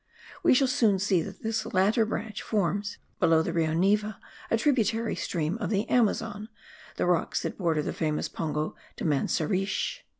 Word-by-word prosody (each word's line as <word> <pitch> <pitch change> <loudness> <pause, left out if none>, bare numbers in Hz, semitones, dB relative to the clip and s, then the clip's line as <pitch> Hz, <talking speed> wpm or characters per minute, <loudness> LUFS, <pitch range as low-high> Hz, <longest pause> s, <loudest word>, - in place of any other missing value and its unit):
We - - +5
shall 270 +1 +4
soon 225 -6 +3
see 190 -2 +2
that 195 +3 -8
this 220 0 -1
latter 210 +3 +2
branch 215 -1 -4
forms, 205 0 -1 0.2
below 165 -3 +4
the 170 - -3
Rio 160 -2 +1
Neva 210 +4 +1 0.3
a 225 - +3
tributary 230 -3 +1
stream 170 +4 -2
of 215 - -2
the 205 0 0
Amazon, 220 -2 +1 0.5
the - - 0
rocks 175 -1 +1
that - - -4
border 165 -4 +1
the - - -3
famous 155 -1 -1
Pongo 155 -1 -3 0.2
de - - -5
Manseriche. 185 - 0
200 Hz, 165 wpm, -28 LUFS, 170-220 Hz, 0.5 s, We